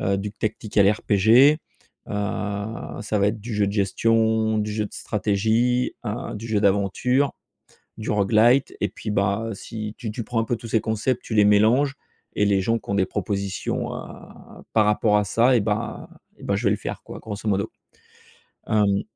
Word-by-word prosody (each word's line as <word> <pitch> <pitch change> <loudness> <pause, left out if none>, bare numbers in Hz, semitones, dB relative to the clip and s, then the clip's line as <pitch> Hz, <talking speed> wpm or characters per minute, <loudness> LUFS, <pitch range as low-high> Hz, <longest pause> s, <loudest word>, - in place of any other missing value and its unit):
heu, 100 +1 +1
du 100 +1 -4
Tactical 105 -2 +1
RPG 110 +8 +4 0.5
heu, - - -6 0.9
ça 105 0 -1
va 100 - +3
être 110 +1 -4
du 115 +3 -7
jeu 105 -1 +2
de 100 - -2
gestion, 110 +2 +2
du 105 0 -2
jeu 105 0 -1
de - - -17
stratégie 110 +5 0
heu, 115 +5 -4
du 115 +2 -7
jeu 105 -2 0
d'aventure, 100 +8 +1 0.6
du 110 - -6
rogue-lite 110 +6 +3
et - - +1
puis 105 - -7
bah, 105 +2 0
si 110 +1 -7
tu 115 -4 -4
tu 115 - -4
prends 120 -2 -2
un - - 0
peu 120 - -1
tous 115 - -10
ces 110 0 +2
concepts, 110 +3 -1
tu 110 - -5
les 105 -1 +5
mélanges 110 +7 +4 0.4
et 105 - +3
les 100 -1 +2
gens 115 +4 +1
qui - - -22
ont - - 0
des 100 -1 +3
propositions 100 -1 -3
à - - -11
par 110 -2 +4
rapport 105 0 +3
à 105 - +1
ça 120 +5 +3
et - - +3
bah 105 +1 -3 0.3
et - - -12
bah 100 - 0
je 110 - -4
vais 100 - +4
le 105 - +2
faire - - -6
quoi, - - -9
grosso 110 0 -5
modo. 100 -1 0 1.0
Hem, 100 -2 +2
105 Hz, 190 wpm, -23 LUFS, 100-115 Hz, 1.0 s, les